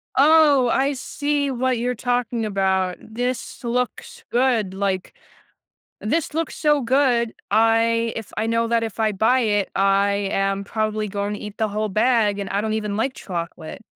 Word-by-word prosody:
Oh, 285 Hz, -2 st, +5 dB
I 275 Hz, +4 st, +1 dB
see 285 Hz, +1 st, -2 dB
what 255 Hz, 0 st, 0 dB
you're 245 Hz, +2 st, -1 dB
talking 245 Hz, -1 st, -1 dB
about, 190 Hz, -3 st, 0 dB
this 245 Hz, +3 st, -4 dB
looks 245 Hz, +1 st, -3 dB
good, 240 Hz, -6 st, +1 dB
like, 190 Hz, -1 st, -2 dB, 0.9 s
this 295 Hz, +8 st, -1 dB
looks 330 Hz, 0 st, -2 dB
so 295 Hz, -2 st, +2 dB
good, 240 Hz, -2 st, +2 dB, 0.2 s
I 225 Hz, +1 st, +3 dB
if 225 Hz, -, -7 dB
I 220 Hz, -, 0 dB
know 230 Hz, 0 st, +1 dB
that 230 Hz, 0 st, +1 dB
if 225 Hz, -1 st, -4 dB
I 215 Hz, -1 st, +2 dB
buy 220 Hz, +6 st, +3 dB
it 205 Hz, -4 st, 0 dB
I 195 Hz, +1 st, +3 dB, 0.2 s
am 195 Hz, 0 st, 0 dB
probably 215 Hz, 0 st, -2 dB
going 200 Hz, +1 st, -3 dB
to -, -, -7 dB
eat 210 Hz, -1 st, -8 dB
the 220 Hz, -1 st, +1 dB
whole 215 Hz, +1 st, -2 dB
bag, 215 Hz, -1 st, +2 dB
and 200 Hz, -1 st, -4 dB
I 200 Hz, -, 0 dB
don't 215 Hz, +1 st, -2 dB
even 210 Hz, -2 st, -2 dB
like 260 Hz, +5 st, -1 dB
chocolate. 170 Hz, -2 st, -6 dB
225 Hz, 170 wpm, -22 LUFS, 205-250 Hz, 0.9 s, Oh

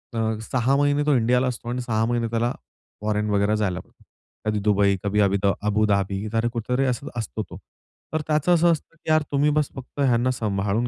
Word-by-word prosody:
अ, 110 Hz, -1 st, 0 dB
6 130 Hz, +4 st, +1 dB
महिने 145 Hz, 0 st, +2 dB
तो 150 Hz, -3 st, +3 dB
इंडियाला 125 Hz, +2 st, +2 dB
असतो 120 Hz, -1 st, -4 dB
आणि 125 Hz, +1 st, -2 dB
6 110 Hz, -2 st, 0 dB
महिने 120 Hz, -1 st, 0 dB
त्याला 120 Hz, +1 st, 0 dB, 0.5 s
फॉरेन 105 Hz, 0 st, 0 dB
वगैरे 100 Hz, +1 st, +2 dB
जायला 95 Hz, -4 st, -1 dB
पडतो. -, -, -18 dB, 0.4 s
कधी 105 Hz, -1 st, 0 dB
दुबई, 100 Hz, -1 st, +3 dB
कधी 105 Hz, +1 st, 0 dB
अभि 100 Hz, 0 st, +3 dB, 0.2 s
अबुधाबी 100 Hz, -1 st, +1 dB, 0.3 s
कुठेतरी 125 Hz, +3 st, 0 dB
असत 130 Hz, +4 st, -2 dB
असतो 95 Hz, -, -3 dB
तो. -, -, -9 dB, 0.6 s
तर 155 Hz, -, 0 dB
त्याचं 155 Hz, +3 st, +2 dB
असं 170 Hz, 0 st, +4 dB
असतं, 165 Hz, +1 st, -4 dB
"की 160 Hz, -, -10 dB
यार! 155 Hz, 0 st, +4 dB
तुम्ही 145 Hz, +1 st, +3 dB
बस 150 Hz, -1 st, +1 dB
फक्त 135 Hz, +2 st, -10 dB
ह्यांना 130 Hz, -2 st, +3 dB
सांभाळून 105 Hz, 0 st, -1 dB
115 Hz, 190 wpm, -24 LUFS, 105-135 Hz, 0.6 s, असं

